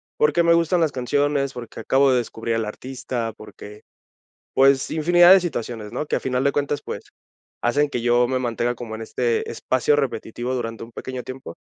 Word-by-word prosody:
Porque, 455 - +3
me 170 - +5
gustan 170 +1 +2
las 160 -3 +2
canciones, 140 +1 0
porque, 120 -2 -9
acabo 135 0 +3
de 125 - +3
descubrir 115 -1 -3
al 115 -1 0
artista, 120 0 -5
porque, 105 0 -12 0.7
pues, 135 0 +4
infinidad 175 +3 +6
de 195 - +7
situaciones, 120 -10 -4
¿no?, 150 - -4
que - - -2
a - - 0
final 130 0 -1
de 140 - +3
cuentas, 145 0 -1
pues, - - -6 0.6
hacen 145 +5 +2
que 125 - -3
yo 120 +1 +3
me 130 0 0
mantenga 120 -1 -1
como 115 -2 -7
en 110 - -6
este 120 +1 -1
espacio 130 +3 +1
repetitivo 125 -2 -3
durante 115 -2 -4
un 115 - -15
pequeño 130 +1 -6
tiempo. 130 -9 -8
130 Hz, 190 wpm, -22 LUFS, 120-145 Hz, 0.7 s, de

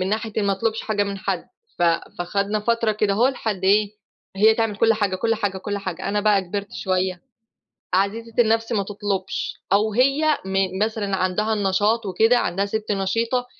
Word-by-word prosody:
من 185 - -1
ناحية 220 +1 -2
إن 210 - +1
ما 200 - +2
أطلُبش 220 +3 -1
حاجة 210 -2 0
من 200 -1 -4
حد. 210 - -2 0.3
ف - - 0 0.4
فخدنا 200 +4 -1
فترة 230 0 +1
كدهو 210 +4 +2
لحد 215 -7 -3
إيه، 205 +1 +4 0.5
هي 220 +3 +5
تعمل 225 -2 -1
كل 225 +1 +4
حاجة، 205 -3 0
كل 225 +4 +1
حاجة، 205 -3 -2
كل 205 +1 -3
حاجة. 185 -1 -5
أنا 205 +1 0
بقى 205 -2 +3
كِبرت 200 +2 -5
شويّة 185 -1 -1 0.7
عزيزة 220 +4 0
النفْس 225 0 +2
ما 210 -3 +1
تطلُبش، 200 -1 -3 0.2
أو 210 +2 +3
هي 275 +6 +3
من 190 -1 -1
مثلًا 210 -3 -2
عندها 190 +4 0
النشاط 210 +2 +1
وكده، 225 +6 +3
عندها 195 -1 -1
سِت 215 +1 -2
نشيطة، 230 +6 0
205 Hz, 175 wpm, -22 LUFS, 195-225 Hz, 0.7 s, هي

